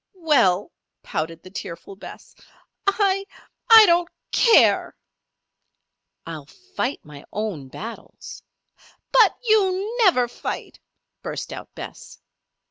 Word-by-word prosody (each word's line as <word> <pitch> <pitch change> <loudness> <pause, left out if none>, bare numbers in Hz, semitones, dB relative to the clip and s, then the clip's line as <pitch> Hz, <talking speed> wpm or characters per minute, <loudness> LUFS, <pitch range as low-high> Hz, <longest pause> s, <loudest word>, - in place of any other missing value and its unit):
"Well," 240 - +2 0.3
pouted 165 +1 -4
the 185 - -13
tearful 190 0 -8
Bess, 195 - -12 0.5
"I 395 -1 +2 0.5
I 450 -1 +10
don't 345 -1 +2 0.2
care!" 465 - +4 1.3
"I'll 155 -4 -8
fight 370 - -5
my 145 -1 -12
own 205 -10 -4
battles." 225 - -10 0.7
"But 460 -5 +5
you 420 -1 +1
never 255 - +4
fight!" 240 - -7 0.4
burst - - -6
out - - -9
Bess. - - -10
285 Hz, 100 wpm, -22 LUFS, -, 1.3 s, I